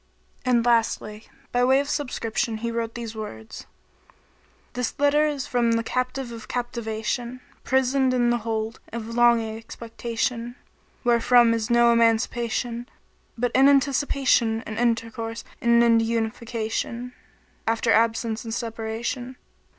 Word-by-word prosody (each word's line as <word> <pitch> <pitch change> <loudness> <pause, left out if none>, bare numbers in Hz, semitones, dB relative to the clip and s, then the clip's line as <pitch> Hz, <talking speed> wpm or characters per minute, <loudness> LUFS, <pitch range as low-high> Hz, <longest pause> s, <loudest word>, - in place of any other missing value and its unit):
" - - -36
And, 240 -2 +3
lastly, 225 -2 0 0.2
by 245 0 +2
way 265 +2 +5
of 285 - -2
subscription 250 -5 -2
he 235 - -1
wrote 230 -1 -3
these 230 -2 -6
words. 110 - -8 1.1
"This 250 -1 -3
letter 290 +2 +3
is 285 -3 -3
from 235 -2 +1
the 230 0 +1
captive 255 +1 -2
of 225 -2 -9
captivation 235 0 -3
* - - -32
prisoned 265 0 +2
in 240 -1 +2
the 240 - +1
hold 225 0 -3
of 230 -1 -5
longing 230 -2 +3
expectation 230 +1 -4 0.2
* - - -36
wherefrom 240 0 +5
is 225 -1 -2
no 235 0 +5
emancipation 235 +1 0 0.2
* - - -39
but 245 0 0
in 270 +2 +6
anticipation 270 -4 +2
and 215 +1 -5
intercourse 230 -1 -1 0.2
and 235 0 +5
in 230 -1 +5
unification 230 +1 -2 0.3
* - - -36 0.2
after 225 +1 +1
absence 225 0 +1
and 225 -1 -4
separation. 230 +2 -4
235 Hz, 140 wpm, -24 LUFS, 225-245 Hz, 1.1 s, in